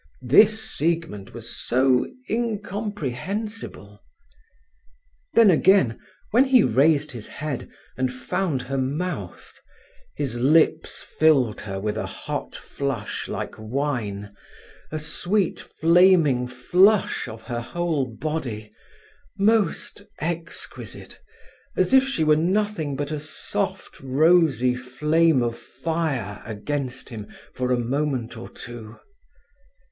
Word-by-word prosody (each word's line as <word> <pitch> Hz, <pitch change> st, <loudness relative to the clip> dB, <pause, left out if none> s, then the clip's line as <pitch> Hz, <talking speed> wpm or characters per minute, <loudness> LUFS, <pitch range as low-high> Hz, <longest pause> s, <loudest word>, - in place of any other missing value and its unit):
This 210 Hz, -, +6 dB
Siegmund 165 Hz, -, -2 dB
was -, -, -7 dB
so 130 Hz, 0 st, +2 dB, 0.2 s
incomprehensible. 205 Hz, -, -4 dB, 1.3 s
Then 225 Hz, -4 st, +7 dB
again, 165 Hz, -, +4 dB, 0.3 s
when 245 Hz, +5 st, +5 dB
he 260 Hz, -4 st, +5 dB
raised 145 Hz, +5 st, +3 dB
his 115 Hz, -4 st, -8 dB
head 150 Hz, -4 st, -5 dB, 0.3 s
and 130 Hz, 0 st, 0 dB
found 130 Hz, +3 st, -2 dB
her 135 Hz, +1 st, -2 dB
mouth, 150 Hz, +8 st, -4 dB, 0.6 s
his 120 Hz, -5 st, -3 dB
lips 155 Hz, +4 st, +3 dB, 0.2 s
filled 140 Hz, -8 st, +4 dB
her 95 Hz, -2 st, -5 dB
with 105 Hz, +1 st, -2 dB
a -, -, -2 dB
hot -, -, -5 dB
flush 135 Hz, -6 st, -4 dB
like -, -, -4 dB
wine, 110 Hz, -5 st, -3 dB, 0.6 s
a 155 Hz, -, -2 dB
sweet, 175 Hz, +5 st, -1 dB
flaming 165 Hz, -7 st, +4 dB
flush 180 Hz, +12 st, +3 dB
of 110 Hz, 0 st, -9 dB
her 120 Hz, -2 st, -4 dB
whole 160 Hz, +1 st, -1 dB
body, 115 Hz, -4 st, -4 dB, 0.7 s
most 205 Hz, 0 st, +1 dB, 0.2 s
exquisite, 165 Hz, +1 st, -6 dB, 0.6 s
as -, -, +2 dB
if 265 Hz, 0 st, +7 dB
she 265 Hz, -12 st, 0 dB
were 155 Hz, 0 st, +5 dB
nothing 180 Hz, -3 st, 0 dB
but 145 Hz, +2 st, -3 dB
a 155 Hz, -, -2 dB
soft 150 Hz, +1 st, -3 dB
rosy 135 Hz, -2 st, +3 dB
flame 140 Hz, +3 st, +2 dB
of 120 Hz, -1 st, -1 dB
fire 150 Hz, -11 st, -3 dB
against 130 Hz, +4 st, -4 dB
him 110 Hz, -4 st, -7 dB, 0.3 s
for 125 Hz, 0 st, -2 dB
a 125 Hz, -, +3 dB
moment 125 Hz, -1 st, -1 dB
or 115 Hz, -, -8 dB
two. 115 Hz, -2 st, -9 dB
145 Hz, 110 wpm, -24 LUFS, 125-175 Hz, 1.3 s, Then